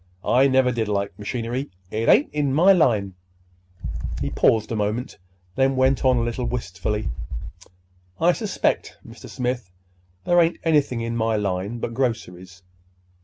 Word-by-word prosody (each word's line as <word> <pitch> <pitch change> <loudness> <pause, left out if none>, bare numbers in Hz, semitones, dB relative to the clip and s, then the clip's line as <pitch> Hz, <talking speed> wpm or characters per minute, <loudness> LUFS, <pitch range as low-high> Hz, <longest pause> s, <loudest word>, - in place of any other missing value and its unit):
I 130 +3 +4
never 130 -1 +3
did 115 -3 -1
like 100 -1 -1
machinery. 120 +5 -3 0.2
It 110 +2 0
ain't 290 - +4
in 145 -3 0
my 185 +6 +6
line." 110 - +2 1.1
He - - -2
paused 110 0 +2
a - - -1
moment, 105 +2 -2 0.3
then 135 0 +2
went 130 +1 +2
on 130 -1 +4
a 120 - +1
little 120 +1 -2
wistfully:— 105 -2 -3 1.1
"I 170 +2 +5
suspect, 210 +1 -1
Mr. - - -12
Smith, 125 -5 -3 0.6
there 175 0 +5
ain't 165 0 +1
anything 145 -7 +2
in 115 0 -3
my 115 -1 +1
line 100 +2 -2
but 115 0 -4
groceries. 95 -8 -3
120 Hz, 145 wpm, -23 LUFS, 105-135 Hz, 1.1 s, my